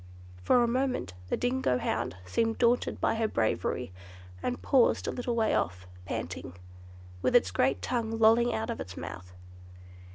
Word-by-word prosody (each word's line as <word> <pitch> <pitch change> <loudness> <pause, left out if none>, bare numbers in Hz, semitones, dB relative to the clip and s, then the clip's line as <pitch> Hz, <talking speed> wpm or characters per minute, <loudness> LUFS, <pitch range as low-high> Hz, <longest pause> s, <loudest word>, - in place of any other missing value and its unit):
For 240 - +4
a - - +2
moment 255 - -1 0.2
the - - 0
dingo 245 - +1
hound 90 - -2
seemed 225 - 0
daunted 240 0 +2
by - - +2
her 225 0 0
bravery, 110 - -1 0.5
and 250 - -2
paused 260 -4 +3
a - - 0
little 245 -1 -2
way 225 -2 +2
off, 90 +2 -1 0.2
panting, 85 - -5 0.7
with - - +1
its 90 - +5
great 130 +8 +1
tongue 225 -2 -1
lolling 225 +2 +5
out 110 0 -2
of - - -5
its 90 +3 -7
mouth. 90 +2 -7
225 Hz, 160 wpm, -29 LUFS, -, 0.7 s, its